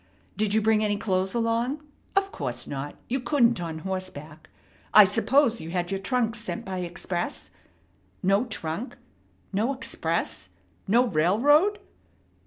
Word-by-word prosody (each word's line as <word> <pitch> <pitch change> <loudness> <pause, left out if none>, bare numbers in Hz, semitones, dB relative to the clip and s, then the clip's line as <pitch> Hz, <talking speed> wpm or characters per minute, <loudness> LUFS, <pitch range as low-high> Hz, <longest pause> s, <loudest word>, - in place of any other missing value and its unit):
Did 210 0 0
you 220 - +3
bring 220 0 +3
any 205 -1 +1
clothes 190 0 -1
along? 235 +5 0 0.3
Of 390 0 +2
course 125 -4 -3
not. 140 +1 -5
You 265 +3 -1
couldn't 235 -5 +2
on 165 -2 -4
horseback. 175 -5 -6 0.5
I 210 - +11
suppose 235 +4 +2
you 160 - -7
had 175 +1 -2
your 195 - -1
trunk 230 +2 0
sent 230 0 -6
by 190 -1 -4
express. 175 0 -4 0.7
No 195 +5 +3
trunk? 200 0 -4 0.6
No 220 +7 +1
express? 165 - -3 0.4
No 235 +5 +4
railroad? 250 - +3
210 Hz, 135 wpm, -26 LUFS, 175-235 Hz, 0.7 s, I